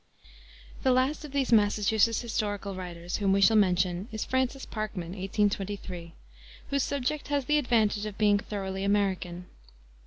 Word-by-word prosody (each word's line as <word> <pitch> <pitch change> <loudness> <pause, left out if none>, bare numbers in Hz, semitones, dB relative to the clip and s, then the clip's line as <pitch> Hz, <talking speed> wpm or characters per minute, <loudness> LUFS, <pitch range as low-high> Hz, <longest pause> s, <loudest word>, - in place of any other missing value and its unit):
The 265 - +2
last 260 +5 +1
of 300 - -8
these 270 -3 +1
Massachusetts 215 +1 +3
historical 205 -4 -2
writers 175 -2 -5
whom 195 -2 +2
we 200 - +3
shall 200 +3 +5
mention 185 -1 +2
is 220 -1 -3
Francis 260 +1 -1
Parkman 215 -6 -5
(1823 195 -2 -2 0.2
), - - -20
whose 280 0 +2
subject 280 +2 -2
has 285 -2 0
the 300 +3 +3
advantage 215 -5 +1
of 205 - -8
being 205 -1 +4
thoroughly 195 -2 -4
American. 190 -3 0
205 Hz, 150 wpm, -28 LUFS, 190-235 Hz, 0.2 s, shall